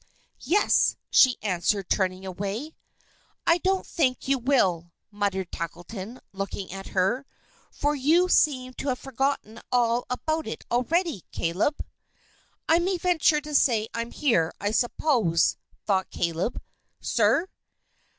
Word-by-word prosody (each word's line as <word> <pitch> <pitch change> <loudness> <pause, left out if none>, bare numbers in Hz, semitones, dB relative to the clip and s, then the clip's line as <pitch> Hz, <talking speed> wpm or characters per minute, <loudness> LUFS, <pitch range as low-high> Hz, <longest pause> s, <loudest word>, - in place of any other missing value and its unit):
"Yes," 400 +8 +3 0.2
she 255 -2 +6
answered, 195 0 0
turning 185 -1 0
away. 200 - -4 0.7
"I 335 +1 +4
don't 380 +1 0
think 260 -7 0
you 270 -1 +2
will," 190 -10 +1 0.2
muttered 200 -3 -2
Tackleton, 185 +7 -6
looking 195 0 -5
at 195 0 -7
her; 215 +9 0 0.4
"for 290 +1 -1
you 310 +6 +3
seem 255 -7 +2
to - - -4
have 255 -2 0
forgotten 270 -4 -2
all 240 -1 +2
about 315 +5 -2
it - - -6
already. 275 - 0
Caleb!" 180 - -1 0.8
"I 325 +1 +5
may 365 +2 0
venture 330 -4 +2
to 300 0 -8
say 225 -6 +3
I'm 230 0 -3
here, 205 - +1
I 205 +1 -1
suppose," 225 - +2 0.3
thought 190 -2 +1
Caleb. 170 +6 -2 0.4
"Sir?" 335 - +2
240 Hz, 125 wpm, -26 LUFS, 195-295 Hz, 0.8 s, she